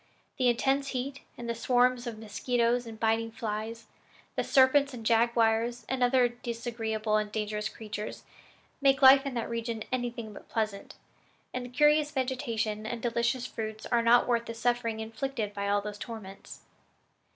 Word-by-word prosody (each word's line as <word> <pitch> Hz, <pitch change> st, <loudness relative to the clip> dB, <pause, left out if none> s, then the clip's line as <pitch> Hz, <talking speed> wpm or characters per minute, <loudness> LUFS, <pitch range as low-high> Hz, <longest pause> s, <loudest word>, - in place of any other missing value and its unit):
The 255 Hz, -, +3 dB
intense 270 Hz, +3 st, +2 dB
heat 275 Hz, +2 st, -4 dB, 0.2 s
and 240 Hz, -, -6 dB
the 235 Hz, -, 0 dB
swarms 245 Hz, +1 st, +2 dB
of 230 Hz, -2 st, -5 dB
mosquitoes 235 Hz, +2 st, 0 dB
and 220 Hz, -1 st, -9 dB
biting 225 Hz, 0 st, +1 dB
flies, 220 Hz, +1 st, -4 dB, 0.5 s
the -, -, 0 dB
serpents 275 Hz, +1 st, +4 dB
and 230 Hz, -2 st, -9 dB
jaguars 230 Hz, +1 st, +2 dB
and 265 Hz, -1 st, -2 dB
other 245 Hz, 0 st, +4 dB
disagreeable 230 Hz, -2 st, -2 dB
and 210 Hz, -1 st, -2 dB
dangerous 210 Hz, 0 st, -2 dB
creatures, 215 Hz, -1 st, -7 dB, 0.6 s
make 270 Hz, 0 st, +3 dB
life 270 Hz, +1 st, +8 dB
in 265 Hz, -, -4 dB
that 235 Hz, -, -2 dB
region 230 Hz, -1 st, -3 dB
anything 240 Hz, -3 st, -3 dB
but -, -, -13 dB
pleasant, 215 Hz, -3 st, -3 dB, 0.6 s
and 250 Hz, 0 st, -3 dB
the -, -, -8 dB
curious 295 Hz, +3 st, +4 dB
vegetation 230 Hz, -6 st, -2 dB
and 230 Hz, 0 st, -5 dB
delicious 235 Hz, +1 st, 0 dB
fruits 220 Hz, -3 st, -5 dB
are 240 Hz, -1 st, +4 dB
not 235 Hz, +1 st, +5 dB
worth 235 Hz, -1 st, +1 dB
the 230 Hz, -, -6 dB
suffering 235 Hz, -1 st, 0 dB
inflicted 225 Hz, -1 st, -3 dB
by 200 Hz, 0 st, -2 dB
all 205 Hz, 0 st, +2 dB
these 210 Hz, 0 st, -7 dB
torments." 215 Hz, -5 st, -9 dB
235 Hz, 160 wpm, -29 LUFS, 220-250 Hz, 0.6 s, life